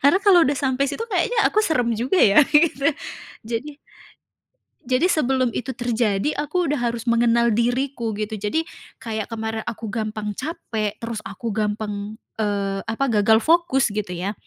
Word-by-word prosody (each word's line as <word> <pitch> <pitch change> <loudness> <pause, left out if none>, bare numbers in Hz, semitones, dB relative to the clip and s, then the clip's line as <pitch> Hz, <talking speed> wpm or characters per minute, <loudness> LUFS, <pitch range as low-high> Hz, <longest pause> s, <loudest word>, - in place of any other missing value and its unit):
Karena 285 +6 +5
kalau 385 -4 +7
sudah 285 -3 +2
sampai 270 -1 0
situ, 455 - -3
kayaknya 450 +2 -1
aku 430 - +3
serem 250 - +1
juga 240 - 0
ya, 210 - +6
gitu. 295 -2 +3 0.6
Jadi 265 +6 -4 1.0
Jadi 255 +7 +1
sebelum 260 -4 +1
itu 250 +2 -4
terjadi, 240 0 0
aku 355 +5 -1
sudah 295 -4 -1
harus 235 -1 -2
mengenal 235 0 +3
diriku, 240 0 -1
gitu. 215 0 -4
Jadi, 215 +11 -1 0.3
kayak 220 -4 -4
kemarin 220 -1 -4
aku 225 -2 -5
gampang 215 -2 -3
capek, 225 - -4
terus 230 -2 -5
aku 220 +3 -5
gampang. 210 0 -3 0.2
eee, 200 -2 -1
apa, 225 +5 0 0.2
gagal 220 +2 +5
fokus 310 -9 +3
gitu 205 -4 -3
ya. 185 +4 -2
235 Hz, 155 wpm, -22 LUFS, 215-275 Hz, 1.0 s, kalau